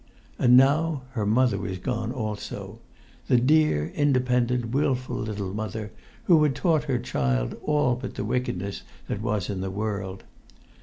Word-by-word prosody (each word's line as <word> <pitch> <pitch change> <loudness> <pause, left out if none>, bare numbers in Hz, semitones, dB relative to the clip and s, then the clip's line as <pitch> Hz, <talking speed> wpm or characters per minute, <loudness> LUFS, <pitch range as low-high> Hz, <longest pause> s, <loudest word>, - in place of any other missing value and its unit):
And 125 0 +6
now 145 +2 +3
her 110 -5 -2
mother 115 -2 +3
was 95 0 -4
gone 115 +4 -3
also; 110 -5 -5 0.5
the 125 - +4
dear, 130 - +3
independent,[Pg 125 -4 +1
88] - - -7
wilful 130 -3 0
little 100 -3 -4
mother, 105 0 -4 0.3
who 165 -4 +5
had 150 -3 +2
taught 160 -5 +1
her 135 -4 0
child 65 - -1
all 150 -4 +2
but 125 +1 -7
the - - -3
wickedness 100 -5 -2 0.3
that 105 - -3
was 105 -4 -1
in 95 -2 -3
the 95 - -3
world! 100 -1 -4
120 Hz, 155 wpm, -26 LUFS, 100-130 Hz, 0.5 s, And